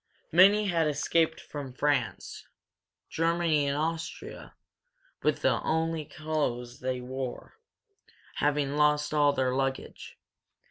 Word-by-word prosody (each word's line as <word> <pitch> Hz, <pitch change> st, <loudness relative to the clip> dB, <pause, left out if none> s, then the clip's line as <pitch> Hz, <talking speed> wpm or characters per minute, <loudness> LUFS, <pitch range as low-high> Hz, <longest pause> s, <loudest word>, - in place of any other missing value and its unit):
Many 200 Hz, +5 st, +6 dB
had 170 Hz, -5 st, +1 dB
escaped 160 Hz, +2 st, +1 dB
from 140 Hz, -4 st, -8 dB
France, 140 Hz, -4 st, -1 dB, 0.6 s
Germany 165 Hz, -3 st, +1 dB
and 140 Hz, +1 st, 0 dB
Austria 160 Hz, +1 st, -5 dB, 0.7 s
with -, -, 0 dB
only 160 Hz, -1 st, 0 dB
the -, -, -18 dB
clothes 145 Hz, -6 st, -2 dB
they 130 Hz, -1 st, -3 dB
wore, 130 Hz, -, -6 dB, 0.8 s
having 145 Hz, -1 st, 0 dB
lost 150 Hz, 0 st, +2 dB
all 145 Hz, -1 st, +4 dB
their 130 Hz, -2 st, 0 dB
luggage. 135 Hz, 0 st, -3 dB
150 Hz, 105 wpm, -28 LUFS, 135-160 Hz, 0.8 s, Many